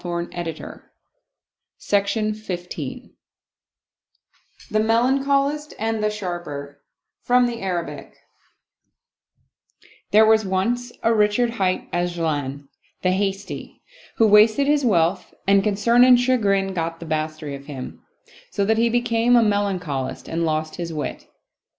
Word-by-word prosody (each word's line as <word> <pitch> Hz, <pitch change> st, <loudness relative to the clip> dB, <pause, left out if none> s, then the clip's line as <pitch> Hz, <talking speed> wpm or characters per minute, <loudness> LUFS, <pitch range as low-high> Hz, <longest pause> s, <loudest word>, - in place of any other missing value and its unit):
95 175 Hz, -1 st, -4 dB
Oriental 165 Hz, -3 st, -6 dB, 1.0 s
Mystery 205 Hz, +2 st, 0 dB, 0.4 s
Stories -, -, -7 dB, 1.6 s
The 215 Hz, -, +2 dB
Melancholist 275 Hz, +6 st, +1 dB
and 220 Hz, 0 st, -2 dB
the 215 Hz, -, +2 dB
Sharper 175 Hz, -8 st, -6 dB, 0.4 s
From 250 Hz, 0 st, +3 dB
the 235 Hz, -1 st, -4 dB
Arabic 170 Hz, -7 st, -5 dB, 1.9 s
'pHERE 215 Hz, +1 st, +6 dB
was 220 Hz, 0 st, +4 dB
once 230 Hz, +6 st, -1 dB
a 230 Hz, -, +3 dB
Richard 215 Hz, +2 st, +2 dB
hight 190 Hz, -5 st, -1 dB
'Ajlan, 155 Hz, -6 st, -2 dB, 0.4 s
the 185 Hz, -, +3 dB
Hasty, 195 Hz, +1 st, -4 dB, 0.3 s
who 225 Hz, -, +4 dB
wasted 215 Hz, +5 st, +5 dB
his 290 Hz, 0 st, +2 dB
wealth, 180 Hz, -5 st, +1 dB
and 200 Hz, 0 st, +4 dB
concern 215 Hz, +4 st, +3 dB
and 250 Hz, -1 st, +7 dB
chagrin 200 Hz, -6 st, +1 dB
got 165 Hz, -1 st, -3 dB
the 170 Hz, -, -8 dB
mastery 155 Hz, -1 st, -3 dB
of 140 Hz, 0 st, -9 dB
him, 135 Hz, -4 st, -8 dB, 0.5 s
so 200 Hz, -, -1 dB
that 220 Hz, +2 st, +2 dB
he 235 Hz, 0 st, +3 dB
became 240 Hz, 0 st, +2 dB
a 235 Hz, -, +5 dB
Melancholist 185 Hz, -11 st, -2 dB
and 165 Hz, +1 st, -2 dB
lost 155 Hz, -1 st, -2 dB
his 170 Hz, -1 st, -4 dB
wit. 150 Hz, -2 st, -5 dB
200 Hz, 120 wpm, -22 LUFS, 170-230 Hz, 1.9 s, and